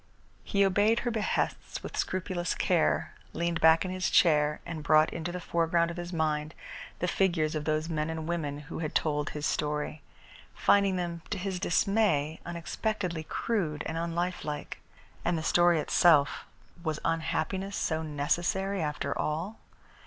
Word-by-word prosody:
He 200 0 +2
obeyed 205 +4 +3
her 240 - -1
behests 220 -2 -2
with - - -7
scrupulous 185 -2 -1
care, - - +1 0.2
leaned 170 -1 -1
back 160 +2 +6
in 185 - -3
his 185 -1 -1
chair 150 -3 +4
and 165 -2 -5
brought 155 +1 +4
into 165 +1 -4
the 180 - -4
foreground 170 0 +1
of 170 - -8
his 175 0 -5
mind 155 -2 -1 0.4
the 180 - -1
figures 170 -5 +1
of 155 -1 -3
those 155 +1 0
men 155 -1 -1
and 160 -1 -4
women 150 -4 -2
who 150 - -7
had 155 -2 -4
told 150 -1 +1
his 150 0 -4
story, 150 0 -1 0.5
finding 200 -2 +3
them, 170 -2 -3
to 205 - -2
his 185 -1 -3
dismay, 175 -5 +1
unexpectedly 175 +1 -3
crude 155 -7 -1
and 160 - -3
unlifelike. 170 -3 -3 0.4
And 175 -1 +1
the 160 - -3
story 175 +1 +4
itself. 150 -4 +4 0.4
Was 155 -3 -2
unhappiness 185 +4 -1
so 160 -1 0
necessary, 175 +6 -1
after 150 -1 -2
all? 165 +8 -2
170 Hz, 150 wpm, -29 LUFS, 155-185 Hz, 0.5 s, back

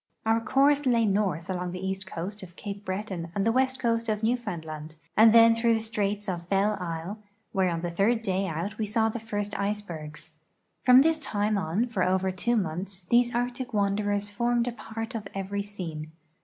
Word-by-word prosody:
Our 225 +1 +3
course 275 +3 +3
lay 235 -2 +4
north 195 -5 0
along 180 -1 -3
the 185 +1 -5
east 190 0 -3
coast 190 +5 -5
of 175 -3 -11
Ca})e 200 0 -7
Breton 185 -3 -4
and 200 0 +1
the 225 - +4
west 260 +2 +2
coast 230 -2 0
of 215 0 -1
Newfoundland, 160 -10 -3 0.2
and 220 +1 +8
then 230 0 +8
through 230 0 +3
the - - 0
straits 210 -2 -2
of 175 -2 -4
Belle 200 +2 +2
Isle, 175 +4 -4 0.3
where 190 -2 +2
on 165 -1 -2
the 175 0 -3
third 220 +6 +2
day 190 -1 0
out 180 +7 -4
we 215 - 0
saw 220 +1 +2
the 235 - -4
first 205 -2 -4
icebergs. 165 -7 -4 0.5
From 250 +1 +8
this 320 0 +2
time 210 -6 0
on 195 +4 0
for 230 -6 -3
over 190 +1 +2
two 235 +6 0
months 185 0 -3
these 240 +5 +3
Arctic 245 +1 -2
w^anderers 205 0 0
formed 235 +2 +1
a - - 0
part 225 -1 -6
of 215 -3 -4
every 195 +1 -2
scene. 165 -7 -6
205 Hz, 195 wpm, -27 LUFS, 185-230 Hz, 0.5 s, and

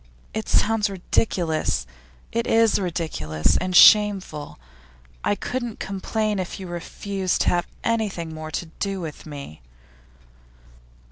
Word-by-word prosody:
It 220 - -4
sounds 215 -1 +3
ridiculous; 175 - 0 0.5
it 230 +1 -1
is 225 -2 +4
ridiculous 155 - -1
and 185 0 -2
shameful. 195 -8 +5 0.7
I - - +2
couldn't 240 0 -4
complain 210 +2 -2
if 185 +2 -4
you 190 - -6
refused 185 +2 -2
to - - +3
have 175 -1 0 0.2
anything 205 -8 -1
more 155 0 -6
to 170 - -3
do 195 -1 -2
with 160 -2 -7
me. 140 - -9
190 Hz, 120 wpm, -24 LUFS, 165-210 Hz, 0.7 s, shameful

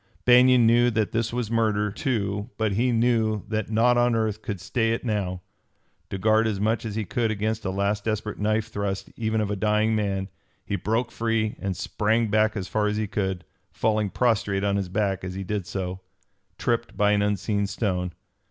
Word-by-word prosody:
Banion 125 0 +6
knew 120 +2 +5
that 110 -2 0
this 115 0 -1
was 120 -2 -3
murder, 105 -3 +1
too, 105 -4 -2
but 110 -2 +1
he 120 +6 +1
knew 115 -3 +2
that 110 -1 -2
naught 120 +2 +3
on 120 -1 +3
earth 110 -1 -1
could 100 -4 -4
stay 115 +3 0
it 115 - -4
now. 95 -5 -2 0.7
To 100 - -3
guard 110 +3 +3
as 105 -3 -1
much 110 +3 0
as 105 -2 -4
he 110 -1 -2
could 115 +3 0
against 110 +1 -2
a - - 0
last 100 +2 -1
desperate 110 -1 -2
knife 110 +2 0
thrust 100 -2 -3
even 110 -1 0
of 105 -1 -1
a - - 0
dying 105 +2 +2
man, 100 -2 -1 0.4
he 100 - -2
broke 115 +4 -1
free 115 -2 -1
and 95 -2 -3
sprang 110 +2 0
back 110 +1 +2
as 95 -2 -3
far 105 -1 0
as 105 0 -1
he 110 - 0
could, 95 -3 -2 0.3
falling 110 -2 0
prostrate 105 -4 +1
on 100 -1 +1
his 100 -2 -2
back 100 -1 -1
as 90 0 -5
he 95 - -4
did 100 -1 -3
so, 90 +1 -4 0.6
tripped 120 -1 -1
by 105 0 +3
an 105 0 +3
unseen 100 0 0
stone. 90 -4 -2
105 Hz, 200 wpm, -25 LUFS, 100-115 Hz, 0.7 s, Banion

